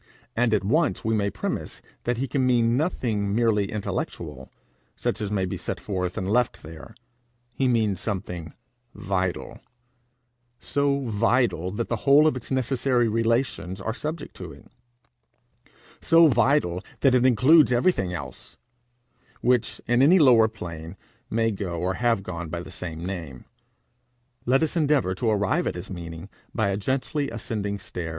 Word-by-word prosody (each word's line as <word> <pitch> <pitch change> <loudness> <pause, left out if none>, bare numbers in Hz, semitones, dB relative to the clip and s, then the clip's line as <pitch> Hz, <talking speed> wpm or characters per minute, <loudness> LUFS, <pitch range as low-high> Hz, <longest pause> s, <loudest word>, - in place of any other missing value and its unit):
And 120 0 +2
at 105 -3 +2
once 150 - +1
we 110 - +1
may 100 -2 +1
premise - - -4 0.3
that 120 0 0
he 135 +3 -1
can 130 +1 0
mean 120 -2 +3
nothing 115 - -1
merely 110 -4 +2
intellectual, 75 -9 -5 0.5
such 105 - -2
as 105 - -2
may 100 -2 0
be 90 - -4
set - - -4
forth 90 -3 -3
and 95 - -2
left 120 +4 +1
there; 80 +7 -11 0.6
he 135 - 0
means 110 -5 +1
something 90 -6 -5 0.4
vital, 95 -2 -2 1.0
so 140 -1 0
vital 115 -5 +1
that 115 +3 -2
the 115 - -1
whole 140 +5 +5
of 155 - +3
its 125 -2 -7
necessary 130 -1 +1
relations 115 -4 0
are 110 +4 -3
subject 155 +6 -6
to - - -8
it, - - -16 1.3
so 165 0 +6
vital 120 - +2 0.2
that 135 -2 +4
it 125 -1 +4
includes 130 +5 +5
everything 120 - +2
else 90 - -8 0.8
which, 125 -2 +1
in 120 +1 +2
any 160 +7 +6
lower 125 -8 +6
plane, 85 -5 -8 0.3
may 115 0 +1
go 95 -4 -4
or 90 +2 0
have 115 -2 +1
gone 85 -3 -6
by 85 +1 -4
the - - -10
same 85 -1 -6
name. 80 -9 -6 1.0
Let 135 +4 +4
us 160 - -1
endeavour 145 - +2
to 110 +5 -1
arrive 100 -2 +1
at - - -2
his 90 +4 -7
meaning 85 0 -7 0.3
by 110 -3 +1
a 100 - -1
gently 135 +6 -1
ascending 105 -3 -4
stair. 90 -3 -6
110 Hz, 155 wpm, -25 LUFS, 95-125 Hz, 1.3 s, so